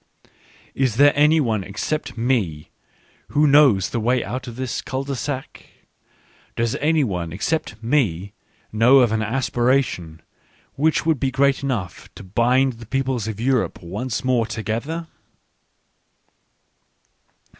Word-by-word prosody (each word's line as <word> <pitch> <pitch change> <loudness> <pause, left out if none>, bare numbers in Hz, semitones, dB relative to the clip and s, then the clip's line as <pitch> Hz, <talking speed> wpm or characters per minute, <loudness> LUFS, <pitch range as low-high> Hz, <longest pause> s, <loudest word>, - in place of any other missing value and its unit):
Is 130 -5 0
there 145 +3 +5
any 150 +2 +4
one 110 -8 0
except 120 +10 -4
me 110 -11 -1 0.6
who 150 +1 +2
knows 140 -10 +5
the 120 - -1
way 120 +2 +1
out 130 +1 -5
of 120 - -7
this 130 0 -3
cul 130 +1 -4
de 140 0 -4
sac? 130 +1 -6 0.9
Does 115 -1 0
any 155 0 +2
one 90 -8 -3
except 110 - -3
me 105 - 0 0.4
know 120 +5 +5
of 120 -3 +3
an 110 0 0
aspiration 120 -7 -1 0.5
which 155 +3 +1
would 160 -4 +1
be 135 - 0
great 140 +1 +2
enough 110 - -4
to - - -10
bind 125 +7 +2
the 115 -1 -13
people 135 +1 -1
of 110 -2 -5
Europe 125 -5 0
once 105 +8 -4
more 125 -3 +1
together 115 +9 -4
125 Hz, 135 wpm, -21 LUFS, 110-135 Hz, 0.9 s, there